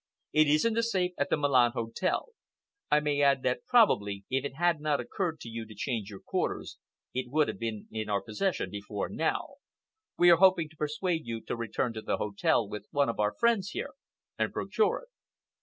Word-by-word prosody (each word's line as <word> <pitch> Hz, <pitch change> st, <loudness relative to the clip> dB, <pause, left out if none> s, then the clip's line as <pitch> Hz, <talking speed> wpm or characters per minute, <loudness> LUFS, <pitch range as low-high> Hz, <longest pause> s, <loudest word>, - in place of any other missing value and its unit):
It 155 Hz, 0 st, +5 dB
is 150 Hz, +5 st, +3 dB
in 230 Hz, -, +3 dB
the 230 Hz, -, +2 dB
safe 190 Hz, -6 st, 0 dB
at 145 Hz, -, +1 dB
the -, -, +2 dB
Milan 130 Hz, -5 st, +4 dB
Hotel. 115 Hz, -, -1 dB, 0.6 s
I 150 Hz, -, +5 dB
may 145 Hz, -1 st, 0 dB
add 140 Hz, -2 st, +4 dB
that 125 Hz, -, -1 dB
probably, 105 Hz, -, +3 dB
if 135 Hz, 0 st, +1 dB
it 140 Hz, -1 st, -5 dB
had 170 Hz, -1 st, +1 dB
not 150 Hz, -2 st, +1 dB
occurred 170 Hz, -5 st, -3 dB
to -, -, -8 dB
you 115 Hz, 0 st, -5 dB
to 110 Hz, -, -12 dB
change 110 Hz, -2 st, -3 dB
your 100 Hz, -2 st, -10 dB
quarters, -, -, -3 dB, 0.3 s
it 125 Hz, -1 st, -3 dB
would 150 Hz, +3 st, +2 dB
have -, -, -5 dB
been 110 Hz, -2 st, -4 dB
in 110 Hz, -1 st, -4 dB
our 100 Hz, -1 st, 0 dB
possession 175 Hz, -, -2 dB
before 105 Hz, 0 st, -4 dB
now. 165 Hz, +11 st, -2 dB, 0.6 s
We 175 Hz, 0 st, +7 dB
are 170 Hz, -, +7 dB
hoping 180 Hz, -3 st, +4 dB
to 160 Hz, -, -20 dB
persuade 155 Hz, +1 st, -2 dB
you 115 Hz, -1 st, -3 dB
to -, -, -4 dB
return 115 Hz, +1 st, -2 dB
to 110 Hz, -, -5 dB
the -, -, -1 dB
hotel 105 Hz, +2 st, +1 dB
with 105 Hz, 0 st, -7 dB
one 140 Hz, -3 st, +2 dB
of 115 Hz, -, -4 dB
our 105 Hz, 0 st, +1 dB
friends 230 Hz, -5 st, +2 dB
here, -, -, -4 dB, 0.5 s
and -, -, +1 dB
procure 440 Hz, -, 0 dB
it." -, -, -19 dB
140 Hz, 205 wpm, -29 LUFS, 115-175 Hz, 0.6 s, We